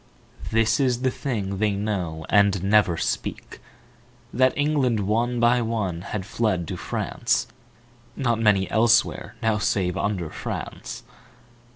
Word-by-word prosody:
This 115 Hz, +2 st, +2 dB
is 125 Hz, -2 st, +1 dB
the 130 Hz, -, +2 dB
thing 100 Hz, -9 st, -3 dB
they 105 Hz, -1 st, +2 dB
know 95 Hz, -6 st, -3 dB
and 100 Hz, -3 st, +3 dB
never 100 Hz, -4 st, +3 dB
speak, -, -, -4 dB, 0.7 s
That 130 Hz, +1 st, +4 dB
England 145 Hz, -7 st, +1 dB
one 115 Hz, +4 st, 0 dB
by 120 Hz, +1 st, +4 dB
one 105 Hz, -7 st, -2 dB
had 95 Hz, +1 st, -5 dB
fled 105 Hz, -6 st, -1 dB
to -, -, -3 dB
France -, -, -1 dB, 0.7 s
(Not 120 Hz, -4 st, 0 dB
many 105 Hz, -4 st, +3 dB
elsewhere 115 Hz, +2 st, +2 dB
now 110 Hz, -2 st, +2 dB
save 95 Hz, -3 st, 0 dB
under 95 Hz, -6 st, -2 dB
France). -, -, -6 dB
110 Hz, 130 wpm, -24 LUFS, 95-120 Hz, 0.7 s, That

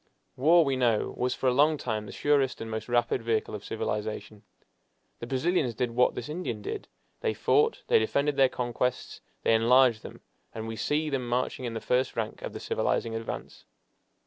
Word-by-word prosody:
War, 165 Hz, +5 st, +5 dB
we 135 Hz, -1 st, +1 dB
know, 120 Hz, -4 st, +1 dB
was 125 Hz, 0 st, -1 dB
for 130 Hz, -, -1 dB
a 125 Hz, -, +4 dB
long 150 Hz, +4 st, +4 dB
time 110 Hz, -5 st, -3 dB
the -, -, -8 dB
surest 140 Hz, -3 st, +1 dB
and 115 Hz, 0 st, -6 dB
most 110 Hz, +2 st, -5 dB
rapid 120 Hz, 0 st, +1 dB
vehicle 115 Hz, -2 st, -1 dB
of 105 Hz, -1 st, -6 dB
civilization. 105 Hz, -1 st, -4 dB, 0.8 s
The 120 Hz, -, -6 dB
Brazilians 135 Hz, -1 st, 0 dB
did 120 Hz, +1 st, -1 dB
what 125 Hz, +2 st, +2 dB
this 120 Hz, -, -5 dB
Indian 170 Hz, +5 st, -4 dB
did: 425 Hz, 0 st, -5 dB, 0.3 s
they 450 Hz, -2 st, -1 dB
fought, 445 Hz, +2 st, +2 dB
they 465 Hz, -1 st, +4 dB
defended 145 Hz, -, 0 dB
their 135 Hz, -1 st, +5 dB
conquests, 125 Hz, 0 st, -2 dB, 0.2 s
they -, -, +3 dB
enlarged 120 Hz, 0 st, +5 dB
them, -, -, -11 dB, 0.3 s
and 110 Hz, 0 st, -5 dB
we 115 Hz, -, -4 dB
see 150 Hz, +6 st, -1 dB
them 130 Hz, -3 st, -2 dB
marching 125 Hz, +1 st, -1 dB
in 115 Hz, -1 st, -4 dB
the -, -, -2 dB
first 125 Hz, +3 st, 0 dB
rank 110 Hz, -2 st, -3 dB
of -, -, -6 dB
the -, -, -6 dB
civilizing 115 Hz, -, -1 dB
advance. 115 Hz, 0 st, -6 dB
125 Hz, 190 wpm, -28 LUFS, 115-140 Hz, 0.8 s, War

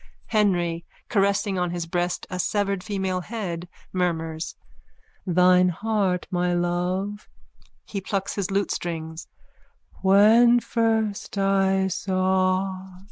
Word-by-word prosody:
HENRY: 175 Hz, -6 st, +1 dB, 0.3 s
(Caressing 200 Hz, -2 st, +1 dB
on 180 Hz, -1 st, 0 dB
his 175 Hz, -1 st, -3 dB
breast 175 Hz, +1 st, -2 dB
a 180 Hz, -, -4 dB
severed 200 Hz, -1 st, 0 dB
female 190 Hz, -3 st, -2 dB
head, 180 Hz, -5 st, -5 dB, 0.2 s
murmurs.) 165 Hz, -3 st, -2 dB, 0.7 s
Thine 180 Hz, +1 st, +5 dB
heart, 195 Hz, -1 st, -1 dB
mine 175 Hz, -1 st, +1 dB
love. 185 Hz, +4 st, -2 dB, 0.6 s
(He 200 Hz, -, -5 dB
plucks 195 Hz, 0 st, -2 dB
his 200 Hz, -2 st, -2 dB
lutestrings.) 170 Hz, -5 st, -3 dB, 0.7 s
When 220 Hz, +5 st, +6 dB
first 220 Hz, -4 st, -1 dB
I 195 Hz, -1 st, +2 dB
saw... 185 Hz, 0 st, 0 dB
190 Hz, 100 wpm, -24 LUFS, 175-200 Hz, 0.7 s, When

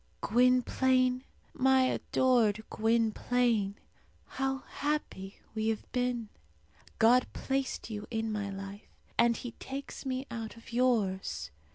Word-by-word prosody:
Gwynplaine 255 Hz, +2 st, +3 dB, 0.3 s
my 265 Hz, 0 st, +4 dB
adored 240 Hz, -4 st, +2 dB
Gwynplaine 225 Hz, -1 st, +1 dB, 0.5 s
how 270 Hz, 0 st, -2 dB
happy 285 Hz, -10 st, -3 dB, 0.2 s
we 220 Hz, 0 st, -1 dB
have 225 Hz, -1 st, -2 dB
been! 245 Hz, -3 st, -1 dB, 0.7 s
God 245 Hz, +3 st, +5 dB
placed 265 Hz, -3 st, -2 dB
you 210 Hz, -1 st, -5 dB
in 225 Hz, -1 st, -2 dB
my 205 Hz, -2 st, -2 dB
life, 195 Hz, +1 st, -8 dB, 0.3 s
and 235 Hz, 0 st, +5 dB
He 245 Hz, -, -6 dB
takes 275 Hz, +1 st, -6 dB
me 260 Hz, 0 st, -2 dB
out 225 Hz, -1 st, -5 dB
of 230 Hz, 0 st, -13 dB
yours. 215 Hz, -, +1 dB
235 Hz, 110 wpm, -31 LUFS, 215-255 Hz, 0.7 s, God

